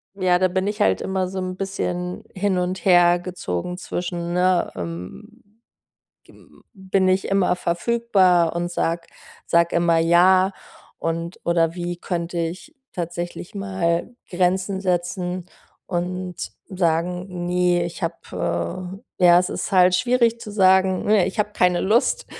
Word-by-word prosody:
ja, 180 -2 +2
da 185 - +3
bin 190 +2 -1
ich 210 0 -3
halt - - +3
immer 190 -1 -1
so 190 0 -5
'n 185 0 -4
bisschen 180 -2 -4
hin 190 -1 0
und 180 +1 -2
her 175 -2 +5
gezogen 180 - -4
zwischen, 175 -1 -4
ne, 180 0 +2
ähm, 90 - -8 0.8
g - - -19
hm, - - -21
bin 190 -1 0
ich 185 +1 +1
immer 195 -2 +2
verfügbar 180 -2 +2
und 175 0 -2
sage 170 0 -1 0.4
sage 170 0 +2
immer 170 -1 +3
ja 185 +3 +5 0.5
und 165 +1 -3
oder 170 -1 +2
wie 175 0 -3
könnte 170 -1 -3
ich 175 - -4 0.2
tatsächlich 175 +1 -5
mal 190 -1 -1 0.2
Grenzen 190 +2 0
setzen 180 -1 -2 0.4
und 180 0 -3 0.3
sagen: 180 0 -1
„Ne, 180 -1 +2
ich 170 +2 -7
habe, 90 - -4 0.2
äh“ - - +3
Ja, 175 0 +8
es 180 +1 0
ist - - -4
halt 180 -1 +5
schwierig 235 +1 +2
zu 210 - -8
sagen, 190 -2 +3
ne, 210 -3 +4
ich 215 - -5
habe 210 0 +1
keine 180 -3 +2
Lust, 220 +5 +1
180 Hz, 145 wpm, -22 LUFS, 175-190 Hz, 0.8 s, Ja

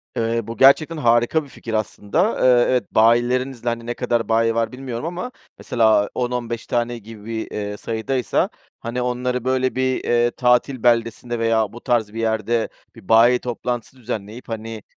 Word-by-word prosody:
Eee, 115 0 0
bu 115 - -6
gerçekten 155 +4 +5
harika 120 +4 +2
bir 140 - -14
fikir 115 -2 -8
aslında. 110 - 0
Eee, 125 -1 +5
evet 125 -1 0
bayilerinizle 120 +2 +2
Hani, 115 0 -4
ne 120 - -2
kadar 120 -1 -1
bayi 115 0 +2
var 115 0 0
bilmiyorum 125 0 -6
ama 180 +9 -4 0.3
mesela, 110 -3 +2
10-15 120 -2 -3
tane 120 0 -1
gibi, 115 0 -9 0.2
eee, 105 0 -4
sayıdaysa, 115 +2 -1 0.3
hani, 120 +2 -4
onları 125 0 -1
böyle 130 0 +1
bir, 130 0 0
eee, 120 0 +2
tatil 125 0 +1
beldesinde 120 0 +1
veya 115 -2 +1
bu 120 - -10
tarz 115 -5 0
bir 115 - -5
yerde 110 +1 0 0.3
bir 110 -3 -16
bayi 120 +2 +6
toplantısı 120 +1 -4
düzenleyip, 115 -1 -6
hani, 115 -1 -6
120 Hz, 160 wpm, -21 LUFS, 115-125 Hz, 0.3 s, bayi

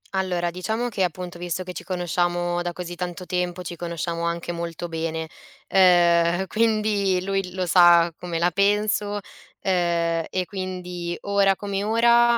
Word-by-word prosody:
Allora 180 -2 0
diciamo 220 +7 -2
che 205 -4 -1
appunto, 175 0 -4
visto 175 +1 -3
che 180 - -7
ci 180 0 -8
conosciamo 175 -1 -1
da 175 0 -3
così 175 0 -6
tanto 180 0 -5
tempo, 180 0 -2
ci 175 -1 -6
conosciamo 170 0 -3
anche 170 0 -2
molto 170 0 -5
bene, 160 0 -3 0.4
ehm, 175 -1 +4
quindi 215 -4 +1
lui 195 -2 -2
lo 185 -1 -1
sa 175 -1 +6
come 175 -2 -4
la 175 +2 +2
penso, 205 +2 +1 0.4
ehm, 170 -3 +1
e 185 - -1
quindi 180 -2 -5
ora 200 -1 +3
come 200 0 -3
ora, 235 +2 +4
180 Hz, 150 wpm, -24 LUFS, 175-195 Hz, 0.4 s, sa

